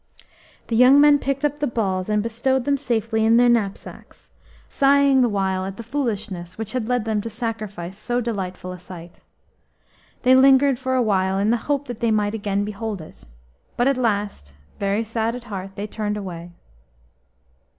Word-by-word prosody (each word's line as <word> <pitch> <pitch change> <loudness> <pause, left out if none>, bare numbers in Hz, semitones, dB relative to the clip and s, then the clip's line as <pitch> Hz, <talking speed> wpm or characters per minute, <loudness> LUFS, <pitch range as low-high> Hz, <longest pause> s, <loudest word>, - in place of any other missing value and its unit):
The 230 - -2
young 255 +4 +7
men 290 0 +6
picked 275 +1 -1
up 295 0 -1
the 290 - 0
balls 195 -5 -2
and 210 -1 +1
bestowed 240 +3 0
them 285 - +2
safely 225 -5 -1
in 225 +1 +5
their 245 0 +5
knapsacks, 215 -5 -3 0.4
sighing 275 -1 +4
the 245 - +3
while 190 -2 -1
at 195 +1 -6
the 230 - -7
foolishness 215 -9 -4
which 220 -1 -5
had 250 -4 -2
led 245 -3 0
them 215 -2 0
to 230 - -5
sacrifice 215 -5 -5
so 245 +2 -1
delightful 190 -6 -4
a 180 - -8
sight. 175 -1 -12 1.0
They 255 - +5
lingered 270 0 +5
for 260 0 -1
awhile 195 -6 +1
in 205 +3 +2
the 240 - +2
hope 285 0 0
that 245 -3 -6
they 235 - +1
might 210 -1 +1
again 205 -2 -1
behold 210 0 -5
it, 155 - -13 0.5
but 245 - +2
at 275 - +3
last, 205 - -2 0.2
very 200 +2 0
sad 225 +1 -2
at 245 - -8
heart, 195 -4 -7
they 205 - -4
turned 210 -1 -3
away. 175 -4 -7
220 Hz, 180 wpm, -22 LUFS, 195-250 Hz, 1.0 s, young